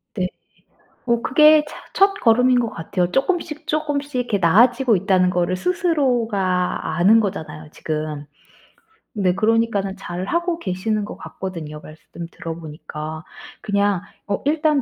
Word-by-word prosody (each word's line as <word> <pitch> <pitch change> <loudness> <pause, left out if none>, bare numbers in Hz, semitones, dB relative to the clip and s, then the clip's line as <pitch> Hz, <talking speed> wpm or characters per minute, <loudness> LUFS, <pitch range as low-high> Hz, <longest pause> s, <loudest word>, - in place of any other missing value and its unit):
네. 185 -3 0 0.8
어 235 -1 +2
그게 305 +2 +6
차 - - -10 0.2
첫걸음인 255 - +4
것 230 - -2
같아요. 175 +2 -2
쪼끔씩, 310 +1 -1
쪼끔씩 290 -2 -2
이렇게 245 -4 0
나아지고 230 +7 +4
있다는 185 0 +2
거를 180 0 0
스스로가 235 - 0
아는 200 +6 +5
거잖아요 160 -6 -5
지금. 155 -2 -4 0.9
네 185 -3 +1
그러니까는 215 -2 +1
잘 185 -2 -5
하고 340 - -1
계시는 205 - -2
것 - - -9
같거든요 165 -5 -7
말씀 160 +2 -10
들어보니까. 155 -1 -7 0.4
그냥 200 -2 +1 0.3
어 200 -1 -2
일단 300 -1 +2
205 Hz, 290 characters per minute, -21 LUFS, 180-265 Hz, 0.9 s, 그게